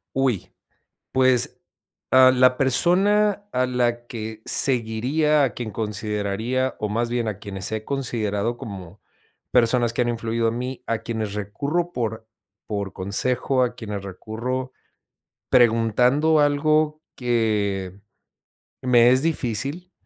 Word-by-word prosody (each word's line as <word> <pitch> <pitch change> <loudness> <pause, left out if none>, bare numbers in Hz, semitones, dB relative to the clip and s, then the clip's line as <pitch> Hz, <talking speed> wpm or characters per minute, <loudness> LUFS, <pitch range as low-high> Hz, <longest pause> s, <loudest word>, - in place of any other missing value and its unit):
Uy, 130 -7 0 0.6
pues, 130 -2 +2 0.5
a 130 0 +8
la 130 0 +4
persona 200 +9 +2
a 130 0 +1
la 120 -1 -1
que 110 -2 -7
seguiría, 135 +5 +2
a 135 - +2
quien 115 -3 -5
consideraría, 105 +4 -2
o 105 - -2
más 115 +3 -1
bien 120 -2 -1
a 105 -3 -3
quienes 100 -1 -5
he 110 0 -3
considerado 115 -5 -2
como 95 -3 -9 0.5
personas 120 -1 +3
que 125 - 0
han 120 - -1
influido 115 0 -1
en 115 +1 -2
mí, 130 +1 -5
a 115 - -1
quienes 110 -4 -4
recurro 145 - -2
por 110 -2 -3 0.4
por 100 -2 -3
consejo, 125 +7 0
a 125 - -3
quienes 105 -3 -6
recurro 120 +7 -5 0.8
preguntando 125 +6 +3
algo 155 +1 +2 0.2
que, 105 -6 -1 0.8
me 120 -1 +5
es 130 +1 +3
difícil, 150 - -2
120 Hz, 125 wpm, -23 LUFS, 110-130 Hz, 0.8 s, a